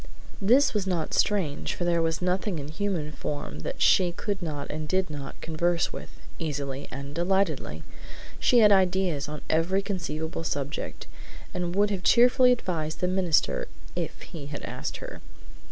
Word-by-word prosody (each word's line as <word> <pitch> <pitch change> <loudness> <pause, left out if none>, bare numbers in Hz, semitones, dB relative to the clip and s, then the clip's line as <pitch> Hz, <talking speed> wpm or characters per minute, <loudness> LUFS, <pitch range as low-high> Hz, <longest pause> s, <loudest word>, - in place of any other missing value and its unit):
This 250 +8 +5
was 205 -3 -1
not 170 -4 -1
strange, 185 -9 +1
for - - -3
there 170 -1 +2
was 165 +1 0
nothing 185 +1 0
in 145 -1 -5
human 165 -2 -2
form 145 - -5
that - - -2
she 180 -2 +5
could 200 +2 -3
not 150 -4 -4
and 155 0 -4
did 185 0 0
not 140 -2 -7
converse 170 +1 0
with, - - -7 0.3
easily 140 -4 -3
and 140 +1 -6
delightedly. 170 - 0 0.6
She 250 - +4
had 210 -1 +7
ideas 185 -6 +2
on 150 0 -6
every 180 +5 +2
conceivable 165 -5 -3
subject, 145 -2 -3 0.5
and 175 0 -2
would 205 +1 +3
have 195 -2 -2
cheerfully 250 +5 +6
advised 165 -10 -1
the 180 - +1
minister 190 - +2 0.3
if - - -4
he 150 -5 -8
had 145 0 -6
asked - - -4
her. 85 - -9
170 Hz, 160 wpm, -27 LUFS, 150-190 Hz, 0.6 s, had